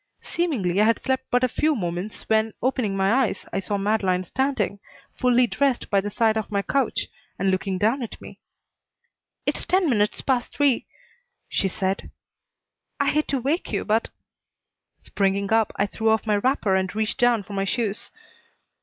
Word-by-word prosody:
Seemingly 215 - 0
I - - +5
had 230 +1 +3
slept 260 0 -1
but 245 +1 +2
a - - +5
few 305 +5 +1
minutes 180 0 -4
when, 220 0 +2
opening 240 -6 0
my 220 +7 +3
eyes, - - -6
I - - 0
saw 200 +1 -2
Madeleine 195 -3 +1
standing, 265 -1 -1 0.4
fully 250 0 +4
dressed, 270 +1 0
by 200 -1 +4
the 205 - -4
side 220 +1 +2
of 220 - -3
my 200 -1 0
couch, 275 +5 0 0.3
and 195 -1 +1
looking 190 0 -1
down 225 +8 +1
at 235 - -6
me. - - -12 1.1
"It's - - -1
ten 370 -1 +2
minutes 210 -6 +1
past 255 -3 -1
three," 280 -4 +2 0.6
she 195 - +1
said. 190 0 -2 0.9
"I - - +2
hate 305 0 +1
to 275 - 0
wake 285 +8 -1
you, - - -1
but 220 +2 +1 0.5
" - - -56
Springing 200 +1 0
up, 225 -2 +3
I 200 - +1
threw 220 +2 -1
off 220 0 +2
my 210 -2 +2
wrapper 225 -3 +1
and 190 +1 -1
reached 215 0 -1
down 240 -3 +3
for 205 - -10
my 195 0 0
shoes. 215 0 -2
220 Hz, 180 wpm, -24 LUFS, 195-255 Hz, 1.1 s, I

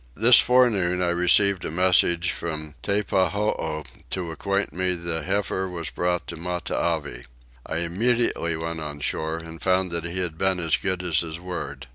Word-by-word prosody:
This 115 +3 +7
forenoon 110 -8 +3
I 90 -1 +1
received 90 +2 +3
a - - -3
message 85 0 +3
from 75 -2 -5
Teppahoo 100 -5 0 0.3
to 90 -3 -3
acquaint 100 +4 -2
me 90 0 +1
the 85 -1 -2
heifer 95 -1 -1
was 85 -3 -5
brought 90 0 -1
to 85 - -5
Matavai. 85 -5 -2 0.4
I - - -4
immediately 90 -1 0
went 80 0 -4
on 75 -2 -6
shore 80 +2 -2
and 80 0 -10
found 95 -1 +1
that 85 -1 -1
he 85 +2 -4
had 85 -3 -3
been 95 -1 +1
as 80 -2 +2
good 95 -2 -2
as 85 -4 +1
his 80 -1 -4
word. 80 -8 -6
90 Hz, 165 wpm, -24 LUFS, 80-95 Hz, 0.4 s, This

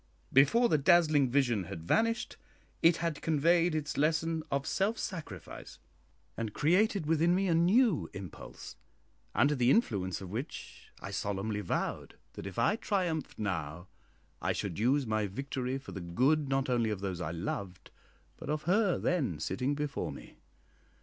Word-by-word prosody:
Before 145 - +5
the 155 - +2
dazzling 155 -4 +4
vision 120 -7 +1
had 80 -1 -7
vanished, 230 +1 +1 0.5
it 165 0 +5
had 165 -3 -2
conveyed 165 +2 +3
its 150 -2 -3
lesson 160 +2 +1
of 140 0 -1
self 200 +7 0
sacrifice, 150 - -7 0.6
and 110 -2 -4
created 185 +3 +2
within 165 +3 +3
me 195 +1 +1
a 170 - +2
new 185 - +3
impulse, 95 -4 -9 0.6
under 145 +1 +4
the 125 -3 +2
influence 100 - +1
of 95 -2 -8
which 125 +9 -7
I 100 - -6
solemnly 100 +2 -2
vowed 90 - -3 0.2
that - - -7
if 95 - -9
I 205 - +2
triumphed 180 -9 -2
now 85 -4 -4 0.5
I - - 0
should 95 -4 -4
use 130 +5 +2
my 110 -2 0
victory 130 +4 -3
for 135 - -10
the 95 - -6
good 135 - +1
not 135 0 +1
only 120 -3 +1
of 105 -3 -3
those 95 -3 -3
I 80 - -2
loved, 90 +3 -5 0.5
but - - -8
of 150 0 -1
her 190 +2 +2
then 135 - 0
sitting 125 - -1
before 145 -1 -3
me. - - -11
140 Hz, 155 wpm, -31 LUFS, 100-165 Hz, 0.6 s, Before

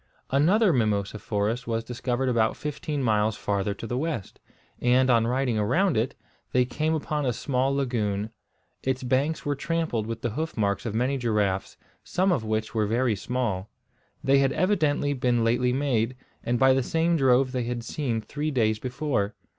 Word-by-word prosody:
Another 180 - +4
mimosa 105 -4 0
forest 110 +4 -2
was 115 -1 -1
discovered 125 +2 -2
about 115 -3 +2
fifteen 150 -1 -3
miles 105 -2 +2
farther 100 0 -1
to 110 - -7
the 120 +2 -2
west; 150 - -4 0.4
and 125 +1 +4
on 115 -1 +3
riding 125 -2 0
around 175 - +2
it, 115 +4 0 0.4
they 125 0 +4
came 155 +6 -1
upon 150 -1 -2
a 125 - +1
small 130 +3 0
lagoon. 110 -6 -1 0.5
Its 130 0 -1
banks 135 +5 0
were 145 - +1
trampled 145 -6 -2
with 115 0 -5
the 120 - 0
hoof 160 +6 -4
marks 100 +1 0
of 110 - -3
many 130 +4 +1
giraffes, 105 -5 0 0.3
some 185 +1 +1
of 135 -10 +1
which 110 0 -2
were 110 -2 +1
very 120 +1 +1
small. 110 -5 -2 0.5
They 135 +1 +4
had 135 -1 +2
evidently 155 -5 +1
been 125 -3 +1
lately 125 +2 +2
made, 125 -3 0 0.3
and 120 +1 0
by 130 +1 +5
the 135 - +2
same 165 +6 +1
drove 130 -2 +3
they 125 -2 -2
had 120 -1 -3
seen 120 -4 -2
three 150 +7 -3
days 110 -6 +1
before. 125 -5 -2
125 Hz, 175 wpm, -26 LUFS, 110-140 Hz, 0.5 s, by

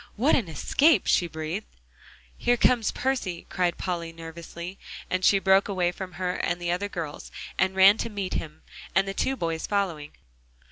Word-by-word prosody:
"What 260 +9 +3
an 230 -9 0
escape," 280 - +3
she 175 - +3
breathed. 160 +6 -5 0.7
"Here 245 0 +2
comes 235 -2 +3
Percy," 250 -10 -2
cried 180 -2 0
Polly 170 -3 -3
nervously, 170 +2 -8 0.3
and 185 0 0
she 195 - +6
broke 190 0 +4
away 180 -3 0
from 185 0 -7
her 180 +2 -2
and 175 - -1
the 175 0 -1
other 190 +3 -1
girls, 165 -6 -6 0.3
and 190 0 +2
ran 195 +3 +7
to 230 - -2
meet 200 -3 -4
him, 155 -1 -5 0.3
and 195 +1 +3
the 195 - -2
two 265 +6 0
boys 165 -7 -2
following. 180 -8 -2
185 Hz, 175 wpm, -26 LUFS, 170-200 Hz, 0.7 s, ran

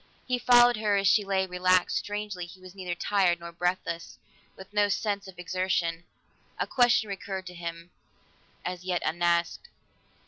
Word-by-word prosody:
He 250 -1 0
followed 245 -1 +6
her 210 -2 +1
as 195 0 +2
she 210 +1 +5
lay 195 -1 0
relaxed; 185 0 +2
strangely, 205 -4 -4
he 185 +2 -14
was 185 -1 -13
neither 185 -3 -4
tired 180 -2 +2
nor 170 0 -8
breathless, 170 -1 -3 0.4
with 190 +1 -12
no 205 -1 +3
sense 200 -1 -1
of 190 -2 -12
exertion. 180 -2 -1 0.5
A - - 0
question 240 -3 +3
recurred 195 -1 -5
to 180 - -8
him, 170 0 -7 0.7
as 180 0 -4
yet 180 -1 -1
unasked. 170 - 0
185 Hz, 160 wpm, -28 LUFS, 175-205 Hz, 0.7 s, followed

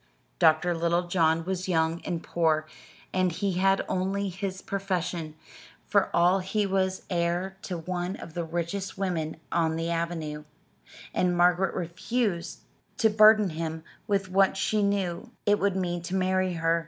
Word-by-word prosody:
Dr. 165 +1 +4
Littlejohn 170 -1 +1
was 185 0 -3
young 165 -1 +1
and 170 -2 -3
poor, 160 -2 +1 0.5
and 185 -1 +2
he 195 +4 -1
had 195 +1 +3
only 195 +2 -1
his 190 +1 -5
profession, 180 -5 -3 0.5
for - - +2
all 175 +3 +4
he 200 +3 -1
was 190 -1 0
heir 175 +2 0
to 180 - -4
one 180 +2 -3
of 165 - -10
the 170 - -2
richest 170 +4 -3
women 170 -5 -2
on 160 -1 +1
the 165 +1 -2
avenue; 165 -3 -3 0.7
and 180 -1 +1
Margaret 180 +2 +3
refused 180 +2 -2 0.4
to 220 -1 +3
burden 215 -2 +6
him 160 0 -4 0.2
with 200 -2 +1
what 195 +1 +3
she 215 +2 +1
knew 200 +1 -1
it 205 0 +3
would 200 -1 +1
mean 175 -2 -1
to 175 +2 -4
marry 185 0 +1
her. 165 0 +1
180 Hz, 150 wpm, -27 LUFS, 170-195 Hz, 0.7 s, burden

